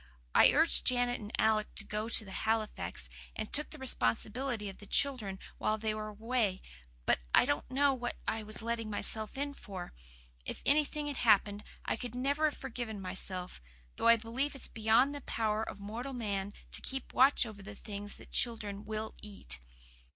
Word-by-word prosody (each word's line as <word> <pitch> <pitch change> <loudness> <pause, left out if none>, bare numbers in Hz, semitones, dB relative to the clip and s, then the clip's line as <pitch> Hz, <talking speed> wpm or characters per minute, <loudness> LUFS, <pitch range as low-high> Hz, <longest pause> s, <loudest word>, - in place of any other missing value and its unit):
I - - +8
urged 320 +3 +6
Janet 245 -1 +2
and 210 0 -8
Alec 215 -1 +2
to - - -1
go 215 +2 -3
to 215 -4 +5
Halifax, 215 - -2 0.3
and 215 - -5
took 300 +1 +5
the 310 - -10
responsibility 240 - 0
of 195 - -8
the 205 - -12
children 230 -9 0 0.2
while 215 - +1
they 220 0 -1
were 215 0 -4
away, 215 -2 -1 0.4
but - - +3 0.2
I - - +6
didn't 145 - -1
know 275 +1 +3
what 245 -2 -4
I 220 - 0
was 215 +1 -7
letting 230 -1 -2
myself 215 +2 -1
in 285 +1 -2
for. 190 -9 -8 0.5
If - - -6
anything 300 +1 +2
had 290 -2 -3
happened 205 -2 +3 0.2
I - - -1
could 245 -1 -6
never 285 +5 +1
have - - -11
forgiven 230 -4 -5
myself 185 - -2 0.4
though - - +1
I 230 - +9
believe 240 +6 -2
it's 275 - -5
beyond 225 +5 +3
the 285 - -6
power 220 -3 -1
of 210 - -5
mortal 230 +7 -5
man 205 -4 -3 0.2
to - - 0
keep 265 -1 -5
watch 265 0 +6
over 215 -3 -9
the 205 +1 -9
things 205 0 -2
children 210 -4 -1
WILL 220 0 -4
eat. 195 - -6
220 Hz, 180 wpm, -32 LUFS, 205-255 Hz, 0.5 s, I